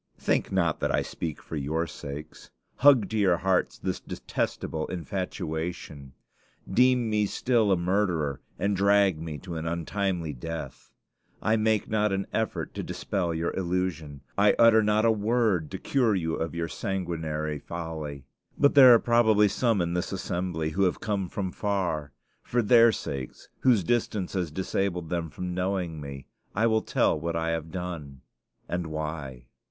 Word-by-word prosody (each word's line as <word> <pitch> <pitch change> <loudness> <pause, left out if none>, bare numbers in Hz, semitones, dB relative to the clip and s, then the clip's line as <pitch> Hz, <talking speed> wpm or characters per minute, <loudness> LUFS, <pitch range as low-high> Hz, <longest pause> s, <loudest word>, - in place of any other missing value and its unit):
Think - - 0
not 85 -4 +1
that - - 0
I - - +1
speak 80 -3 -5
for - - -7
your 80 +3 -1
sakes. 75 -1 -9 0.3
Hug 130 -6 +6
to 110 - 0
your 95 -4 +4
hearts 95 +1 +1
this - - -3
detestable 80 -1 -3
infatuation. 80 -4 -5 0.5
Deem 125 +3 +3
me 105 -1 +1
still 115 -2 +1
a 95 - +4
murderer, 85 -6 0 0.2
and 100 0 0
drag 100 -3 +3
me 80 -2 -5
to 90 +2 -8
untimely 85 +1 -2
death. 75 +2 -7 0.5
I 110 - +2
make 110 -1 +1
not 105 -1 +1
an 95 0 -1
effort 110 0 -2
to - - -4
dispel 90 -4 -2
your 80 +1 -2
illusion; 85 -6 -2 0.2
I 100 0 +5
utter 115 -1 +6
not 105 +1 +2
a 115 - +5
word 105 -6 +1
to 95 - -5
cure 120 -1 +1
you 80 -3 -1
of 80 +1 -3
your 85 -1 -1
sanguinary 80 -6 -3
folly: 80 -4 -6 0.3
but 140 - +4
there 130 -4 +9
are - - +5
probably 110 -3 +4
some 115 -2 +1
in 85 0 -1
this 90 0 -2
assembly 90 -4 -2
who 95 +5 -1
have 90 - 0
come 100 -4 -2
from 95 -1 -3
far; 90 -9 -2 0.3
for 120 0 0
their 115 +1 +6
sakes, 70 - -6
whose 120 -7 +4
distance 105 -2 -1
has 90 -4 -1
disabled 90 0 -2
them 85 -2 -1
from 90 +5 -5
knowing 90 -3 -2
me, 70 -1 -8 0.3
I 110 +4 +2
will 110 -1 +3
tell 75 - +1
what 85 +1 -3
I 80 0 0
have 80 -1 -3
done, 80 -6 -6 0.5
and 90 -2 -2
why. 75 -5 -5
90 Hz, 160 wpm, -27 LUFS, 80-105 Hz, 0.5 s, there